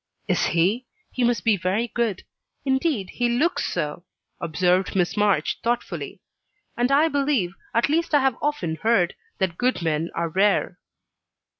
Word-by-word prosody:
"Is - - +2
he? 200 +9 +1 0.2
He 255 - -1
must 240 -1 +1
be 225 -2 +4
very 195 +6 0
good. 230 -5 -2 0.4
Indeed, 265 - 0
he 245 -1 0
looks 290 +9 +1
so," 160 0 -3 0.4
observed 180 +4 +1
Miss 180 -2 +1
March, 205 -7 +1
thoughtfully. 240 +1 -3 0.5
"And 245 +2 +1
I 295 +4 +5
believe 275 - 0 0.2
at 235 - +3
least 320 +1 +1
I 290 - +5
have 265 -2 +2
often 180 - -1
heard 195 -2 +2 0.2
that 185 -3 -1
good 250 -7 +1
men 160 +1 0
are 170 0 -1
rare." 195 +5 +1
220 Hz, 150 wpm, -24 LUFS, 175-255 Hz, 0.5 s, I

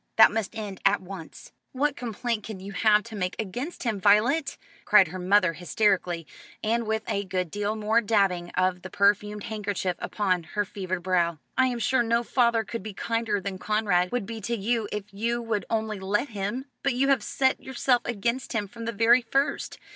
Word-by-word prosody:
That 220 - +8
must 220 0 -3
end 205 -3 -6
at 200 +1 +4
once." 185 -3 -10 0.2
"What 280 +2 +1
complaint 235 -2 -3
can 210 -2 -7
you 195 +2 -8
have 210 +1 +3
to 225 +1 -9
make 180 -2 -2
against 245 - -4
him, 220 -6 -1
Violet?" 240 +9 +3 0.3
cried 200 -5 +6
her 185 +3 -6
mother 185 -1 +3
hysterically, 180 -2 0 0.4
and 230 +1 0
with 220 0 0
a 200 - -1
good 185 -3 -2
deal 205 +1 -1
more 220 +2 +2
dabbing 195 -5 +1
of 185 -1 +1
the 185 - -8
perfumed 205 +1 +1
handkerchief 205 -4 -2
upon 185 -4 0
her 205 0 +1
fevered 185 -3 -4
brow. 170 -3 +1 0.2
"I 260 - +4
am 245 -1 -2
sure 240 +3 +2
no 235 0 +1
father 235 -2 +2
could 230 +1 -5
be 205 0 -7
kinder 230 -2 -1
than 195 -1 -5
Conrad 200 -4 +1
would 245 -4 -1
be 225 +1 -6
to 235 +3 -2
you 225 +1 -1
if 210 -1 -3
you 235 +4 -1
would 225 -3 -2
only 220 -2 -1
let 205 +8 0
him. 215 +5 -3 0.2
But 275 -3 0
you 275 +2 +2
have 270 -4 +4
set 265 +4 +1
yourself 255 -1 +1
against 240 +4 -2
him 210 -3 -1
from 230 +3 -9
the 230 - -1
very 230 +4 +5
first. 270 +5 -1
210 Hz, 195 wpm, -26 LUFS, 195-235 Hz, 0.4 s, That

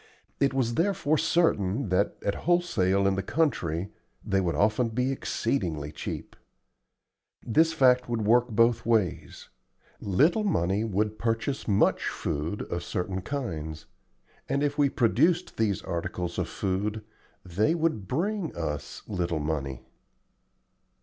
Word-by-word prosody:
It 140 -1 +3
was 130 -3 0
therefore 165 -2 +1
certain 140 - +1
that, 90 +2 +1
at 100 - +1 0.2
wholesale 100 - +2
in 100 - +3
the 95 - -1
country, 100 - -1 0.3
they 95 0 +1
would 85 -4 -1
often 110 +7 +2
be 125 +4 0
exceedingly 85 - -2
cheap. 75 - -6 1.1
This 160 +8 +3
fact 125 -5 +4
would 115 -2 -1
work 120 +3 +4
both 115 +1 +3
ways: 110 -6 -1 0.5
little 150 - +2
money 100 - +1
would 105 0 -1
purchase 115 +4 -1
much 100 -2 +2
food 80 +8 -3
of 85 0 -4
certain 95 +2 -3
kinds, 80 - -5 0.6
and 140 - +1
if 145 -1 0
we 145 -2 +3
produced 165 +9 +2
these 105 -4 0
articles 85 +1 -3
of - - -2
food 105 +3 -2 0.4
they 105 - +1
would 160 - -1
bring 180 - -1
us 75 -4 -4
little 85 -5 -1
money. 70 -4 -3
110 Hz, 130 wpm, -27 LUFS, 90-140 Hz, 1.1 s, fact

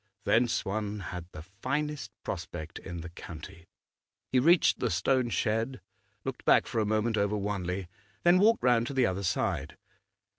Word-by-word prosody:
Thence 115 +3 +2
one 105 +1 -2
had 90 -1 -6
the 75 - -9
finest 140 - -3
prospect 80 +1 -5
in 85 -2 -7
the 85 - -7
county. 85 0 -10 0.6
He 130 - +4
reached 170 +6 +5
the 125 - +1
stone 125 +6 +2
shed, 115 +3 0 0.4
looked - - -5
back - - +5
for 115 - -2
a 105 - +1
moment 110 +1 +1
over 100 +1 +1
Wanley, 95 -2 -2 0.4
then 175 +1 +6
walked 225 +4 +4
round 120 -2 +4
to 140 - -5
the 130 -2 +4
other 95 -1 -1
side. 90 - -1
110 Hz, 160 wpm, -30 LUFS, 95-125 Hz, 0.6 s, then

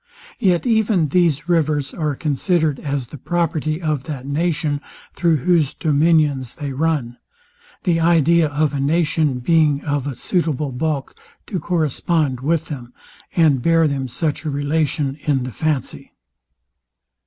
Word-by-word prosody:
Yet 185 -5 +2
even 220 - +2
these 165 -2 +2
rivers 155 -5 +1
are 150 -4 -2
considered 155 +1 0
as 140 -4 -3
the 145 - -8
property 160 -1 -1
of 155 -6 -2
that 135 -4 -6
nation, 150 0 -1 0.3
thro' 170 -2 +2
whose 155 0 +1
dominions 150 -4 +2
they 145 -2 -5
run; 140 -5 -1 0.7
the 170 -2 +2
idea 165 0 +4
of 145 0 0
a 140 - -2
nation 150 -1 +1
being 150 +1 +2
of 145 -2 -1
a 140 - -4
suitable 150 -2 -1
bulk 140 +1 -2 0.3
to 190 - -3
correspond 155 -4 0
with 155 +4 0
them, 125 -5 -8 0.4
and 155 -7 +4
bear 165 +2 +3
them 135 -2 -2
such 145 +6 -2
a 155 - -2
relation 145 0 -1
in 140 -4 0
the 125 - -5
fancy. 150 +3 -3
150 Hz, 140 wpm, -20 LUFS, 140-165 Hz, 0.7 s, idea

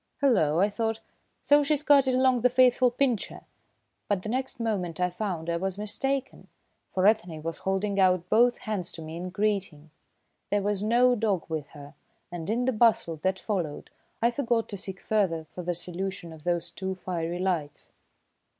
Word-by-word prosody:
"Hullo!" 185 - +3
I 200 - +4
thought. 225 +2 -2 0.4
"So 290 0 +5
she's 295 0 0
carted 275 -3 +5
along 255 -1 +3
the 250 - +4
faithful 250 0 +4
Pincher!" 245 -3 -1 0.7
But 200 -3 0
the 215 - -4
next 260 +1 -2
moment 190 -8 -2
I 180 0 +1
found 180 -4 -4
I 170 0 0
was 190 +2 -3
mistaken, 265 +6 -2 0.4
for 185 0 +1
Ethne 180 -8 +2
was 165 0 -4
holding 195 +1 -1
out 180 -2 +3
both 240 +5 +4
hands 200 -5 -3
to 165 - -8
me 160 +1 -7
in 180 +2 -5
greeting. 190 -6 -2 0.6
There 205 -1 +1
was 205 -1 0
no 240 +4 +4
dog 210 -7 0
with 155 -3 -4
her, 145 0 -11 0.4
and 175 0 -6
in 240 +3 0
the 260 - +1
bustle 215 -7 +3
that 190 +5 0
followed, 175 -9 -3 0.3
I 235 - +4
forgot 235 -3 0
to 205 - -4
seek 190 0 -6
further 190 -7 0
for 180 - -6
the 175 0 -2
solution 180 0 -4
of 160 0 -14
those 175 -1 -1
two 190 0 -4
fiery 175 -2 -3
lights. 170 -6 -3
195 Hz, 175 wpm, -27 LUFS, 175-235 Hz, 0.7 s, So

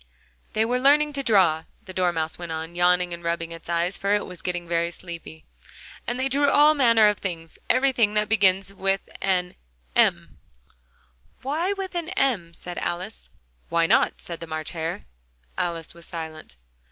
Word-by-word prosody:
"They 220 +1 +2
were 250 +2 0
learning 295 +3 +4
to 280 - -1
draw," 185 -10 +3 0.2
the 185 - -9
Dormouse 175 -4 0
went 170 -2 -6
on, 160 +1 -5
yawning 180 0 +2
and 170 0 -8
rubbing 170 0 -2
its 165 0 -10
eyes, 170 +2 0
for 200 +1 +2
it 205 - -1
was 180 -2 -9
getting 175 -1 -3
very 170 0 +1
sleepy; 170 -2 -10 0.6
"and 245 +1 -2
they 260 - +1
drew 280 +1 +3
all 295 +2 +6
manner 230 -7 +5
of 210 -1 +1
things 165 -4 -6
everything 250 -5 +3
that 210 0 +2
begins 195 -2 +3
with 195 0 -1
an 180 -2 +1 0.4
M - - +2 0.5
" - - -37
"Why 320 +9 0
with 390 -1 -5
an 345 -1 -3
M?" 210 -12 +1
said 175 -1 -7
Alice. 185 +6 -5 0.4
"Why 170 0 +3
not?" - - +3
said 170 -1 -7
the 165 - -8
March 155 0 -4
Hare. 165 0 -4 0.5
Alice 165 -2 -3
was 170 0 -13
silent. 160 - -7
180 Hz, 175 wpm, -25 LUFS, 170-230 Hz, 0.6 s, all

